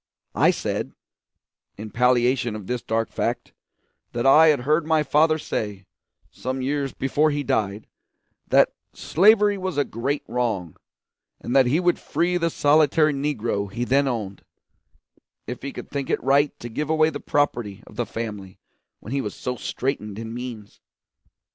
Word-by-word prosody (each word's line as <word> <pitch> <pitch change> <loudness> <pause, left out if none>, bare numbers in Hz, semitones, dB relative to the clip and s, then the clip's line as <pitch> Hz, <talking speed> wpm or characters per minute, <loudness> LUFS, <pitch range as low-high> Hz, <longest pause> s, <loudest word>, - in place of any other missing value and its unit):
I - - +4
said, - - -2 0.8
in 105 +1 -8
palliation 125 -1 +2
of 105 -3 -7
this 125 +3 -3
dark 115 0 -2
fact, - - -3 0.6
that 120 +1 -2
I 155 +4 +7
had 150 -5 +3
heard 155 +4 +1
my 160 -1 +3
father 155 +2 +3
say, 105 -9 -4 0.5
some 130 +1 -4
years 140 +1 -1
before 145 +3 +1
he 145 -1 -2
died, 105 -4 -1 0.6
that - - +4 0.2
slavery 205 +2 +4
was 185 -4 -3
a 145 - +2
great 135 +6 -3
wrong, 110 -9 -2 0.6
and 125 - -4
that 135 -2 +6
he 145 +7 +2
would 175 -1 +1
free 180 +1 0
the 165 -1 0
solitary 155 0 +3
Negro 120 -8 -2
he 120 +4 -3
then 135 +3 +2
owned 105 -6 -4 1.0
if 125 - -6
he 140 - -5
could - - -9
think 140 -2 -3
it - - 0
right 140 +2 +2
to 120 - -7
give 150 +6 -4
away 155 0 +3
the 145 - -5
property 115 -10 -1
of 105 - -15
the 120 +1 -2
family 105 -5 -6 0.4
when 110 - -7
he 140 - 0
was 105 - -5
so 125 - -4
straitened 110 -4 -3
in 115 0 -6
means. 120 -4 -8
130 Hz, 160 wpm, -23 LUFS, 115-150 Hz, 1.0 s, I